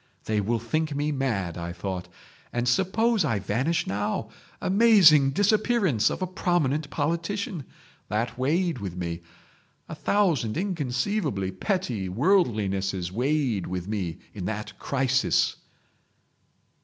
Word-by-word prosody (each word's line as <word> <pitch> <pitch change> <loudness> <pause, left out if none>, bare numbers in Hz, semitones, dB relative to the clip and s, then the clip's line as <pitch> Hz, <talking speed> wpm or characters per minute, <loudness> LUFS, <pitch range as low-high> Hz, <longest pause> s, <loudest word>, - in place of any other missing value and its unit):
'They 105 -1 +1
will 115 +4 0
think 150 +7 -1
me 145 +1 0
mad,' 110 - -2
I 85 0 -4
thought. 90 0 -5 0.4
'And 120 0 -1
suppose 195 - +2
I 115 -8 +1
vanish 125 - 0
now!—Amazing 150 - +3
disappearance 205 - +2
of - - -3
a - - +2
prominent 160 -5 0
politician!' 170 - -2 0.4
That 115 +3 -1
weighed 160 +4 0
with 95 -4 -5
me. 85 -1 -4 0.7
A - - -7
thousand 165 - +1
inconceivably 145 - -1
petty 120 - -2
worldlinesses 100 - +1
weighed 125 -2 0
with 90 0 -4
me 95 -6 -3 0.2
in 95 -4 -5
that 105 +1 -5
crisis." 135 -1 +1
130 Hz, 115 wpm, -26 LUFS, 100-170 Hz, 0.7 s, now!—Amazing